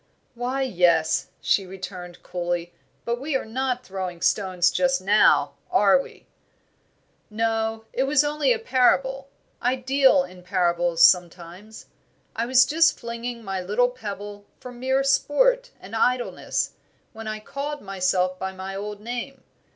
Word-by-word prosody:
"Why, 250 +3 -2
yes," 175 -9 +2
she 195 -2 +1
returned, 180 -2 -9
coolly, 175 -1 -3 0.3
"but 235 +1 -2
we 285 0 -2
are 265 - -1
not 250 +2 -2
throwing 185 -2 -5
stones 185 -1 +2
just 270 0 +1
now, 205 +3 +4 0.2
are - - +4
we?" 465 -3 -14 1.0
"No, 225 0 -1
it 260 - +1
was 285 +1 +3
only 295 -2 +1
a 235 - +3
parable; 265 +3 +1 0.3
I 250 +1 +1
deal 260 -5 +3
in 180 0 -12
parables 175 -2 +1
sometimes. 180 +4 0 0.5
I 230 +1 -2
was 255 0 +6
just 325 +2 +3
flinging 235 0 -6
my 195 -2 -3
little 210 +7 +1
pebble 205 -4 -8
for 250 - -9
mere 260 +2 0
sport - - +2
and 200 +4 -9
idleness, 245 +2 0 0.4
when 225 -1 -8
I 215 0 -4
called 285 +6 -5
myself 185 -1 0
by 190 0 -4
my 190 +1 -7
old 205 +1 -6
name. 245 +4 -6
225 Hz, 140 wpm, -24 LUFS, 185-260 Hz, 1.0 s, was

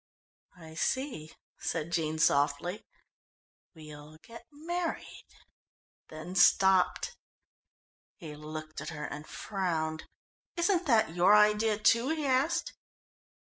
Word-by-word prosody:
"I 160 -2 -12
see," 240 - -3 0.2
said 155 +2 -3
Jean 160 -2 -1
softly. 145 +6 +1 0.9
"We'll 150 -1 -12
get 230 -1 -13
married 335 +3 -5 0.4
" - - -79
then 155 +3 -8
stopped. 190 - +3 1.0
He 155 -5 -9
looked 155 0 -8
at 155 - -6
her 150 -2 -6
and 150 +1 -8
frowned. 165 -6 -3 0.5
"Isn't 350 0 +1
that 220 - +3
your 185 +4 +5
idea, 210 +1 +3
too?" 230 +4 +3
he 315 -2 -2
asked. 270 +4 0
180 Hz, 105 wpm, -30 LUFS, 155-235 Hz, 1.0 s, your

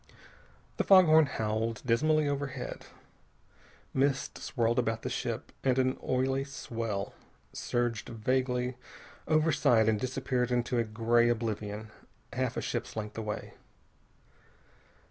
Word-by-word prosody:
The - - +2
fog 190 -2 +8
horn 155 -1 +6
howled 110 -1 -2
dismally 155 +6 +3
overhead. 140 -2 -4 1.1
Mist 135 0 0
swirled 120 +1 +1
past 115 -1 -2
the - - -3
ship, - - -3
and 130 -1 +2
an 130 0 +1
oily 130 +1 +1
swell 115 -7 -4 0.4
surged 120 -2 -2
vaguely 125 +2 -1 0.5
overside 150 -7 +3
and 110 -2 +2
disappeared 130 0 -1
into 120 0 0
a - - +3
gray 115 +2 +2
oblivion 110 -2 -3 0.4
half - - -1
a - - 0
ship's - - -3
length 105 -1 -5
away. 105 -1 -5
120 Hz, 115 wpm, -30 LUFS, 110-135 Hz, 1.1 s, fog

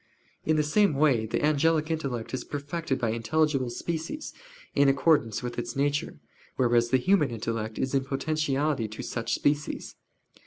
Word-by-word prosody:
In 155 - +3
the 155 - +3
same 160 +2 +3
way 135 -7 +3
the 130 - 0
angelic 155 +1 +2
intellect 135 -8 -3
is 130 - -2
perfected 145 0 -3
by 115 -3 0
intelligible 135 +3 +1
species, 165 - -4 0.4
in 140 0 +4
accordance 135 -6 +2
with 120 0 -4
its - - -5
nature; 145 +1 0 0.4
whereas 120 -2 +3
the 130 - +4
human 155 +2 +3
intellect 110 -1 -4
is 130 - -1
in 135 -1 +1
potentiality 145 -2 0
to 110 - -7
such 115 -1 -2
species. 145 0 -1
140 Hz, 155 wpm, -27 LUFS, 120-155 Hz, 0.4 s, in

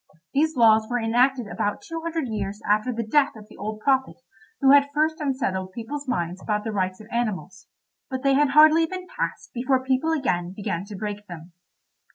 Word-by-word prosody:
These 310 +3 +2
laws 220 -2 +5
were 245 - 0
enacted 245 +2 +2
about 205 0 -3
two 330 0 -6
hundred 325 -4 -2
years 210 -2 -4
after 215 +4 +2
the 230 -1 -3
death 285 +4 +2
of 210 -1 -12
the 215 - -16
old 215 +2 -5
prophet 265 +1 +1 0.4
who 270 -1 +5
had 285 0 +6
first 315 +1 +1
unsettled 195 -10 -2
people's 280 +6 -6
minds 180 -6 -2
about 210 -1 -1
the 220 - -3
rights 185 -2 -2
of 215 - -11
animals; 195 -6 -3 0.4
but 260 0 -4
they 275 0 +4
had 290 +1 +3
hardly 310 +2 +7
been 370 +1 -6
passed - - -5
before 260 +1 0
people 265 +5 +1
again 180 - -1
began 190 -3 -4
to 205 0 -9
break 210 0 -5
them. 170 0 -10
235 Hz, 195 wpm, -24 LUFS, 205-280 Hz, 0.4 s, hardly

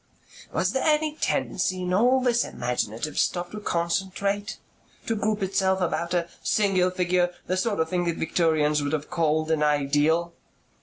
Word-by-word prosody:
"Was - - 0
there 265 - 0
any 305 0 +1
tendency 185 -10 -1
in 180 0 -1
all 250 +7 +4
this 240 -2 +2
imaginative 120 +3 -3
stuff 175 0 0
to 210 - -6
concentrate? 195 +3 -1 0.5
To 225 - -1
group 210 0 -1
itself 190 0 +1
about 170 0 -1
a 170 -1 0
single 195 -3 +2
figure, 180 -1 +1
the 185 - -1
sort 200 +1 -1
of 160 0 0
thing 175 0 0
that 170 -1 -1
Victorians 155 -2 +1
would 145 +1 -2
have 155 +1 -3
called 160 -2 +1
an 160 -1 +1
ideal?" 150 +3 +2
180 Hz, 160 wpm, -25 LUFS, 160-200 Hz, 0.5 s, all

